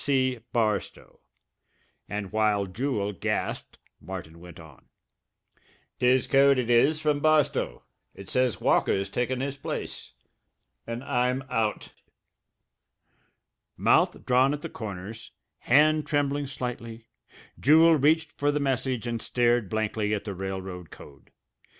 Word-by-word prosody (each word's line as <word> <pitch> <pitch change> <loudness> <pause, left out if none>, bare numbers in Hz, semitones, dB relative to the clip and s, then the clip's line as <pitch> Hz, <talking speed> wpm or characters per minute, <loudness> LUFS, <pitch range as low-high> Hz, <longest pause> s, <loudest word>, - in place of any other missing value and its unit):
BARSTOW." 110 -4 -2 0.9
And 105 -2 -4
while 105 -2 +1
Jewel 105 0 -2
gasped 95 - -3 0.2
Martin 85 -3 -8
went 85 -1 -12
on: 80 -4 -16 1.1
"'Tis 125 0 +3
code 140 0 +4
it 120 -1 0
is, 140 +6 +4
from 150 -2 +1
Barstow. 155 0 +1 0.3
It 100 - -11
says 125 -1 0
Walker's 95 0 +1
taken 125 +1 -1
his 140 +1 -3
place 100 - -6 0.7
and 115 +2 -5
I'm 125 -1 0
out." 110 -2 -1 1.8
Mouth - - +2
drawn 130 +3 +3
at 150 - -11
the - - -4
corners, 105 0 -8 0.3
hand 150 +3 +3
trembling 145 -1 0
slightly, 120 -4 -6 0.5
Jewel 160 +3 +6
reached 155 +2 +2
for 145 0 0
the 150 - -1
message 130 -3 -1
and 115 -1 -3
stared 120 -4 +1
blankly 110 -1 -1
at 100 - -5
the 100 - -5
railroad 95 -2 -6
code. 70 -2 -15
120 Hz, 120 wpm, -26 LUFS, 105-140 Hz, 1.8 s, Jewel